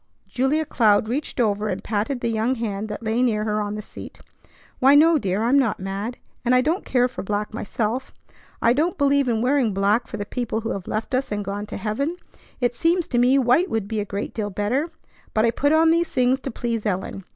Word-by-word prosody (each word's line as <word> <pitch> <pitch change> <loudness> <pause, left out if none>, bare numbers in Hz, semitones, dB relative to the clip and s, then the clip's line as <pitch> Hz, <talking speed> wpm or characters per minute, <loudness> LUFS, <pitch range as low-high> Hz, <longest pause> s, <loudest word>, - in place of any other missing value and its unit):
Julia 275 +5 0
Cloud 215 -6 +3
reached 275 +4 -3
over 210 -2 +1
and - - -3
patted 225 +4 -2
the 235 - 0
young 225 +3 0
hand 215 -3 -3
that 210 - -6
lay 225 +2 0
near 220 -4 +1
her 215 0 0
on 205 0 -3
the 210 - -6
seat. - - -11 0.6
"Why, 275 +2 +6
no, 320 +1 +6
dear! 200 -1 -1
I'm 255 +5 +4
not 230 -6 0
mad, 195 +5 -4 0.3
and 250 +1 +3
I 250 - +5
don't 320 +8 0
care 250 -1 +2
for 255 - -7
black 210 +2 -3
myself. 230 +3 -3 0.5
I 230 - +5
don't 320 +6 0
believe 280 -1 +3
in 225 -1 0
wearing 255 -6 +2
black 200 +4 +2
for 215 - -6
the 205 - -4
people 225 0 -3
who 225 - -3
have 195 -2 -5
left 215 +4 -3
us 255 -1 0
and 205 -1 -2
gone 205 +2 -4
to - - -6
heaven. 230 - -2 0.4
It 245 -1 +1
seems 335 +6 +1
to 240 - +1
me 250 +3 +4
white 270 +8 +3
would 220 -3 -2
be 220 0 -2
a - - 0
great 200 0 -5
deal 210 -2 -3
better. 210 - -1 0.5
But 215 +1 +4
I 230 - +3
put 285 +4 +1
on 320 +1 +5
these 340 +1 +2
things 255 +1 +2
to 270 - -5
please 230 -2 -3
Ellen. 195 -1 -3
230 Hz, 230 wpm, -23 LUFS, 210-265 Hz, 0.6 s, Why